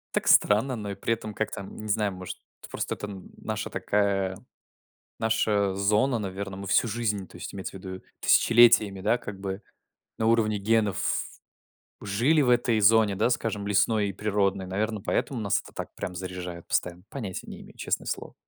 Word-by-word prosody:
Так - - 0
странно, 115 +5 +4
но 105 -2 -5
и - - -5
при 105 +4 0
этом, 110 -2 -5
как-то 110 -1 -3
не 105 +2 -8
знаю, 105 -1 +1
может 95 -1 -7 0.3
просто - - -3
это 105 - -6
н 95 -3 -9
наша - - -4
такая, 100 -2 0 0.8
наша 105 -3 +1
зона. 105 +6 +2
Наверно, 100 -1 -5
мы 100 - -7
всю 110 - +3
жизнь- 105 -4 -2
то - - -17
есть - - -7
имеется 95 0 -6
ввиду 95 0 -8 0.2
тысячелетиями- 110 -4 +5
да, 110 +5 +2
как 105 -4 -8
бы 95 +1 -5 0.6
на 110 - +1
уровне 110 -2 +3
генов 105 -1 +1 0.8
жили 120 +10 +2
в 130 - +2
этой 120 -2 +3
зоне, 105 -1 +5
да, 105 - +2
скажем, 110 -4 -1
лесной 105 +1 +2
и 100 - -5
природной, 100 -1 0
наверно, 105 +3 -1
поэтому 125 +5 -1
нас 100 -2 +1
это - - -13
так - - -7
прям 95 -3 -5
заряжает 90 -1 -6
постоянно, 90 0 -1
понятия 105 -9 -6
не - - -9
имею, - - -15
честное - - -2
слово. - - -4
105 Hz, 175 wpm, -27 LUFS, 95-110 Hz, 0.8 s, тысячелетиями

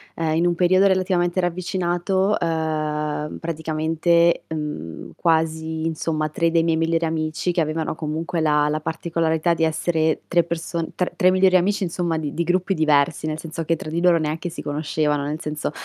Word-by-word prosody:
eh, 160 -1 0
in 170 - +2
un 175 - +3
periodo 185 +2 +4
relativamente 185 -1 +1
ravvicinato, 180 +2 0
uhm, 155 -2 -2
praticamente, 165 +1 +1
mhmm, 150 - -5
quasi, 160 -1 0
insomma 155 -1 -1
3 165 +2 0
dei 165 0 +3
miei 165 -1 +2
migliori 165 +1 +1
amici 160 +2 -1
che 170 - +1
avevano 155 0 -2
comunque 160 +2 -3
la 150 -1 +3
la 155 +1 -1
particolarità 165 +1 0
di 165 - -1
essere 160 0 0
3 175 -1 +3
perso 170 0 -3
tr 180 - -1
3 185 0 +4
migliori 185 0 +4
amici, 195 +3 +2
insomma, 170 -1 -1
di 150 -2 -4
di 170 - -1
gruppi 180 +3 +1
diversi, 155 -1 +2
nel 155 0 -3
senso 165 0 -5
che 165 +1 0
tra 155 - -7
di 165 +2 -2
loro 175 -1 +5
neanche 155 +3 -2
si - - -7
conoscevano, 150 0 -1
nel 150 +2 -3
senso, 150 -1 -3
165 Hz, 175 wpm, -22 LUFS, 155-175 Hz, -, loro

